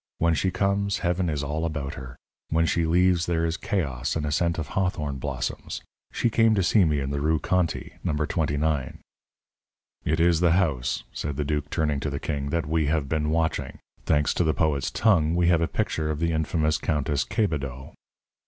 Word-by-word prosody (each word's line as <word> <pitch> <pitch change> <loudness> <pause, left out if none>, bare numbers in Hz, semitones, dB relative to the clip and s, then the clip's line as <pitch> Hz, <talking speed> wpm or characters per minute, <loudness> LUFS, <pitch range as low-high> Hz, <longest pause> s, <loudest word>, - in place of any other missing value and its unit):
When 85 0 +2
she 95 +4 +1
comes, 100 +2 0
heaven 90 0 +1
is 75 -2 -2
all 75 +3 -2
about 75 -4 -3
her; 65 -1 -9 0.3
when 80 +1 +2
she 85 0 +1
leaves, 90 0 +3
there 85 -1 +1
is 80 0 -1
chaos 65 -12 -2
and 80 -2 -1
a 75 - -2
scent 85 +2 +1
of 75 -3 -4
hawthorn 85 -7 -1
blossoms. 65 -2 -4 0.3
She 120 - 0
came 115 0 +4
to 95 - +2
see 95 +2 +4
me 75 -2 +1
in 70 0 -3
the 70 0 -2
Rue 80 +2 +2
Conti, 85 0 -1
number 75 0 0
twenty 75 -3 -1
nine." 75 -4 -1 1.1
"It 80 +2 0
is 85 -1 +4
the 85 -1 +4
house," 75 -11 0
said 75 -2 -4
the 75 - -1
duke, 75 -1 -2
turning 75 -3 0
to 75 - -2
the 70 0 -3
king, 70 -2 -3
"that 85 +1 0
we 80 0 +1
have 75 -2 0
been 75 +1 0
watching. 80 0 -1 0.3
Thanks 75 0 +2
to - - +1
the 80 -2 +1
poet's 75 -4 +1
tongue, 85 -8 +3
we 85 0 +3
have 85 -2 +4
a 85 - +2
picture 80 -1 -1
of 75 - -1
the 85 0 +1
infamous 80 -1 0
Countess 75 -3 0
Quebedaux." 70 - -2
80 Hz, 200 wpm, -26 LUFS, 75-85 Hz, 1.1 s, came